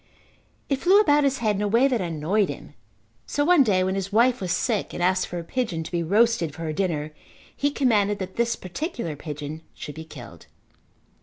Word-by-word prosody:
It 275 - 0
flew 375 +7 +5
about 295 -8 +4
his 275 -1 +1
head 210 -2 +2
in - - -2
a 210 - +1
way 230 +6 +4
that 245 -6 0
annoyed 175 +4 0
him, - - -8 0.5
so 290 - 0
one 350 -2 +6
day 195 -7 +3
when 190 0 0
his 195 0 -3
wife 240 +3 +3
was 180 -2 -2
sick 225 0 -1
and 175 - -2
asked 185 +1 +2
for 175 - -6
a 170 - -4
pigeon 185 -5 -2
to - - -9
be 175 -1 0
roasted 200 -3 +2
for 165 - -7
her 155 -1 -2
dinner 155 -4 -2 0.4
he 285 - +1
commanded 210 -8 +2
that 190 -1 -6
this 235 0 +1
particular 185 - -5
pigeon 150 +1 -7
should 150 - -7
be 160 - -8
killed. 160 - -12
200 Hz, 210 wpm, -24 LUFS, 165-245 Hz, 0.5 s, one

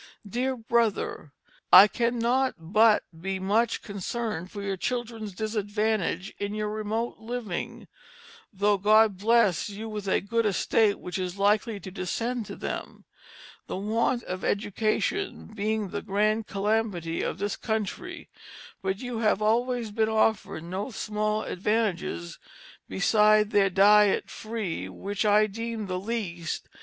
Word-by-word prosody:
"DEAR 255 +5 -1
BRO^R: 225 -8 0 0.4
"I 195 +3 +11
cannot 240 +3 +1
but 210 +6 +4 0.2
be 190 +1 -2
much 210 +5 +1
concerned 200 -2 -4
for 200 0 -7
your 195 -1 -1
children's 230 0 -3
disadvantage 210 -2 -1
in 205 +1 -3
your 210 0 -2
remote 215 +2 -3
livinge 225 -5 -5 0.7
(tho' 205 0 +2
God 215 +2 +5
has 190 -1 -15
blest 215 -5 +3
you 210 +2 -6
with 210 -2 -5
a - - +3
good 225 +3 0
Estate 205 +2 +2
which 180 +1 -5
is 185 +1 -3
likely 205 +2 +2
to 190 - -8
descend 225 +5 -3
to - - -7
them) - - -6 0.6
the - - -4
want 230 +4 0
of 185 0 -5
Education 215 - -1
being 215 -1 -1
the - - -4
grand 215 +2 0
Calamity 200 -5 -1
of - - -2
this 205 +1 -2
Country, 220 - -4 0.5
but 190 +1 -2
you 245 -3 -4
have 215 -3 +2
always 230 +1 +1
Been 220 +1 +1
offered 220 -6 +1
no 185 +7 -4
small 215 -2 -2
advantages, 185 - -2 0.5
besides 210 - +4
their 200 -2 +4
diet 205 +2 +4
free, 220 -6 -4
w^ch 205 +2 -2
I 210 +1 +5
deeme 225 +1 -4
the 185 -1 -3
Leest. 185 -6 -4
210 Hz, 135 wpm, -27 LUFS, 195-225 Hz, 0.7 s, I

